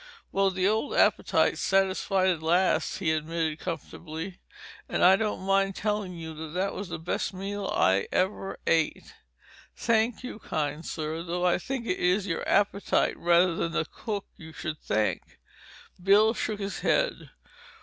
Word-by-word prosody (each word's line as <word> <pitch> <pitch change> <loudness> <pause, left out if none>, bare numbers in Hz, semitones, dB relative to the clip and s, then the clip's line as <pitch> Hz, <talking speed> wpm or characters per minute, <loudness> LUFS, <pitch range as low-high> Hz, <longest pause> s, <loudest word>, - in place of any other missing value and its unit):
"Well, 195 0 +3
the 185 0 0
old 220 +7 0
appetite's - - +3
satisfied 195 0 +2
at 170 -4 0
last," 175 +4 +2
he 165 -5 0
admitted 160 0 -1
comfortably. 165 +1 -6 0.5
"And - - 0
I 185 +2 +8
don't 210 -1 -2
mind 195 0 +2
telling 210 -3 -2
you 160 -1 -7
that 190 +2 -1
was 200 -2 -6
the 170 - -4
best 170 +3 -3
meal 200 +1 -4
I 95 +3 +2
ever 195 +1 -1
ate." 160 -1 0 0.6
"Thank 230 +1 +1
you, 250 -3 -7
kind 150 -4 -3
sir. 160 0 -4
Though 175 +1 -2
I 180 - +3
think 255 +5 -4
it 185 - -1
is 185 +3 +2
your 165 -4 -2
appetite 200 -1 +2
rather 175 +1 +3
than 165 0 -2
the - - 0
cook 205 +4 -5
you 160 -1 -11
should 155 -2 -5
thank." 110 0 -1 0.7
Bill 210 +3 +5
shook 215 -3 -3
his 195 -1 -4
head. - - 0
185 Hz, 155 wpm, -27 LUFS, 165-200 Hz, 0.7 s, I